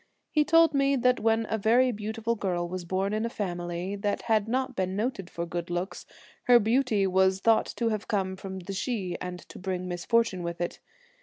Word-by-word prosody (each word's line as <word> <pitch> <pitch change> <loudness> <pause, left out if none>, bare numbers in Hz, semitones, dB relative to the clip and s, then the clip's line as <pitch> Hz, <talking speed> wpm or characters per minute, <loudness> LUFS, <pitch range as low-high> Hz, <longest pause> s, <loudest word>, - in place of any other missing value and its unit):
He 300 - +4
told 330 +1 +5
me 275 0 +3
that 250 0 +2
when 225 0 +2
a 220 - -1
very 245 +5 +4
beautiful 220 +1 -2
girl 180 -5 -2
was 180 0 -5
born 190 +3 -1
in 215 +1 0
a 230 - -1
family 175 -2 -3
that 205 0 -2
had 220 -2 +2
not 260 +2 -1
been 185 0 -1
noted 205 -4 -2
for 170 - -4
good 170 0 -4
looks, 175 +2 -4 0.4
her 245 -1 +8
beauty 225 -2 +2
was 190 0 +3
thought 225 +2 +3
to 230 -1 +1
have 215 -1 -3
come 190 -3 -1
from 190 0 -7
the 190 +3 -6
Sidhe, 195 -3 -2
and 180 0 -4
to - - -10
bring 185 -1 -3
misfor 185 +7 +2
tune 190 -5 -5
with 170 0 -4
it. 175 - -3
200 Hz, 210 wpm, -28 LUFS, 185-230 Hz, 0.4 s, her